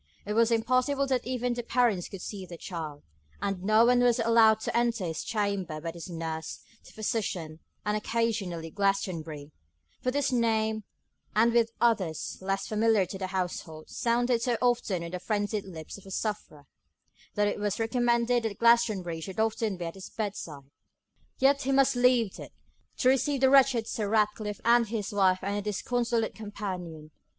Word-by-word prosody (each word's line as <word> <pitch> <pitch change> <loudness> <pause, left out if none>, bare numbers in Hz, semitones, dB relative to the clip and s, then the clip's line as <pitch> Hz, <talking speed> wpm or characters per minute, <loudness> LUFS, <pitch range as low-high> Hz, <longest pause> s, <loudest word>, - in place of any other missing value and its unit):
It 210 - -2
was 230 +1 +4
impossible 255 +5 +2
that 260 -3 -1
even 250 -1 -1
the 240 - -3
parents 235 -6 +1
could 195 -2 -8
see 195 -3 -6
their 170 - -9
child, 160 -5 -6 0.4
and 195 -2 -2
no 215 +4 +5
one 245 +1 +4
was 245 -1 +4
allowed 225 -2 +5
to - - -3
enter 235 -4 +1
his 160 -2 -3
chamber 200 -7 -2
but 165 +1 -5
his 170 +2 -8
nurse, 160 -1 -5 0.2
the - - -15
physician, 195 -8 -3 0.3
and 210 0 +1
occasionally 210 -7 -2
Glastonbury; 170 -7 -2 0.5
for 255 - 0
this 280 +1 0
name, 220 -3 +1 0.5
with 230 +1 +4
others 195 -10 0
less 195 +1 -1
familiar 215 -2 +2
to 190 +2 -7
the 190 - -2
household, 175 -4 -4
sounded 240 0 +1
so 240 -1 +1
often 240 -8 +1
on 170 - -6
the 180 - -4
frenzied 205 +1 -2
lips 165 0 -9
of 195 - -19
the - - -11
sufferer, 195 -8 -4 0.7
that 205 0 +2
it 205 - -2
was 205 0 -1
recommended 235 +1 +2
that 225 -3 -3
Glastonbury 215 -8 +3
should 190 +4 -6
often 220 -2 0
be 175 - -4
at 165 - -5
his 190 -1 -10
bedside. 190 -9 -5 0.7
Yet 275 +1 +4
he 275 - -1
must 270 -1 +4
leave 245 -4 +3
it, - - -10 0.4
to 255 - +3
receive 270 +1 +1
the 265 0 +5
wretched 265 -4 +5
Sir 210 -3 -2
Ratcliffe 210 -1 0
and 235 0 +5
his 215 -1 -3
wife 190 -2 +2
and 200 +1 -1
their 205 - -1
disconsolate 230 +3 -1
companion. 180 -7 -6
215 Hz, 170 wpm, -28 LUFS, 185-235 Hz, 0.7 s, no